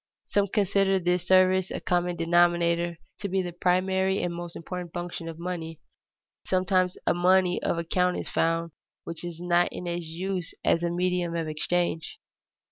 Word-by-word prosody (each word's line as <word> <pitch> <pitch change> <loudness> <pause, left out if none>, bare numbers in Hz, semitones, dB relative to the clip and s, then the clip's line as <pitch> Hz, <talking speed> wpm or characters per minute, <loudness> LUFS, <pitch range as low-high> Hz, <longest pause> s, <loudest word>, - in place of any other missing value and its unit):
Some 200 -1 +1
consider 195 -1 +2
this 180 -1 0
service 185 0 +4
as - - -4
a - - -5
common 175 0 0
denominator 170 0 +2 0.2
to 200 - -3
be 190 0 +1
the 175 -1 -5
primary 190 +2 +1
and 175 - -1
most 170 0 -7
important 175 0 -6
function 175 -1 -5
of 160 - -8
money. 170 -2 -5 0.7
Sometimes 185 -1 +1
a - - +3
money 180 +1 +3
of - - 0
account 180 +2 +1
is - - -4
found, 165 0 0 0.3
which 165 0 -6
is 170 -1 -6
not 175 0 +2
in 180 - -6
use 175 +1 -4
as 165 - +3
a 170 - 0
medium 175 -1 0
of 165 -1 -2
exchange. 160 +1 -1
175 Hz, 165 wpm, -27 LUFS, 170-185 Hz, 0.7 s, service